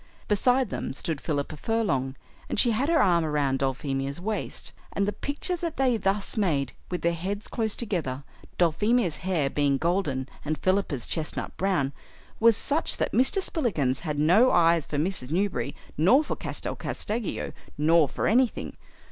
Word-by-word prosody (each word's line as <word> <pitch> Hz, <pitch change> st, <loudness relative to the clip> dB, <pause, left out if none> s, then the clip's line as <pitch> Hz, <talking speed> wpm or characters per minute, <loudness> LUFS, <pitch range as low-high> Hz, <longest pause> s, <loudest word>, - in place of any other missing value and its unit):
Beside 245 Hz, +3 st, +2 dB
them -, -, -3 dB
stood 150 Hz, +2 st, -3 dB
Philippa 145 Hz, -1 st, -2 dB
Furlong, 140 Hz, -, 0 dB, 0.3 s
and -, -, 0 dB
she 240 Hz, -, +5 dB
had 255 Hz, +7 st, 0 dB
her 330 Hz, -1 st, +4 dB
arm 175 Hz, -3 st, +3 dB
around 145 Hz, -4 st, 0 dB
Dulphemia's 135 Hz, +1 st, -2 dB
waist; 215 Hz, +4 st, -4 dB, 0.2 s
and 200 Hz, 0 st, 0 dB
the 205 Hz, -, -1 dB
picture 290 Hz, +6 st, -2 dB
that 335 Hz, -2 st, -4 dB
they 260 Hz, -3 st, +3 dB
thus 195 Hz, -1 st, 0 dB
made, 150 Hz, -, 0 dB, 0.2 s
with 180 Hz, -, -4 dB
their 170 Hz, 0 st, +2 dB
heads 195 Hz, +5 st, -4 dB
close 220 Hz, -2 st, -1 dB
together, 160 Hz, -, -2 dB, 0.3 s
Dulphemia's 180 Hz, +2 st, +2 dB
hair 175 Hz, -6 st, 0 dB
being 140 Hz, 0 st, +1 dB
golden 155 Hz, -6 st, 0 dB, 0.2 s
and 155 Hz, +1 st, -2 dB
Philippa's 185 Hz, -9 st, 0 dB
chestnut 160 Hz, -1 st, -3 dB
brown, 175 Hz, -8 st, 0 dB, 0.5 s
was 230 Hz, -1 st, +5 dB
such 305 Hz, +3 st, 0 dB
that -, -, -1 dB
Mr. 265 Hz, +10 st, +3 dB
Spillikins 160 Hz, -, 0 dB
had 150 Hz, -4 st, -3 dB
no 180 Hz, -, +5 dB
eyes 165 Hz, -2 st, +3 dB
for 145 Hz, -, -3 dB
Mrs. 155 Hz, -4 st, -2 dB
Newberry 160 Hz, -7 st, -1 dB, 0.2 s
nor 245 Hz, -, +5 dB
for -, -, -3 dB
Castel -, -, -4 dB
Casteggio 215 Hz, -1 st, -3 dB, 0.2 s
nor 155 Hz, 0 st, +4 dB
for -, -, -3 dB
anything. 245 Hz, +1 st, +1 dB
175 Hz, 160 wpm, -27 LUFS, 145-220 Hz, 0.5 s, she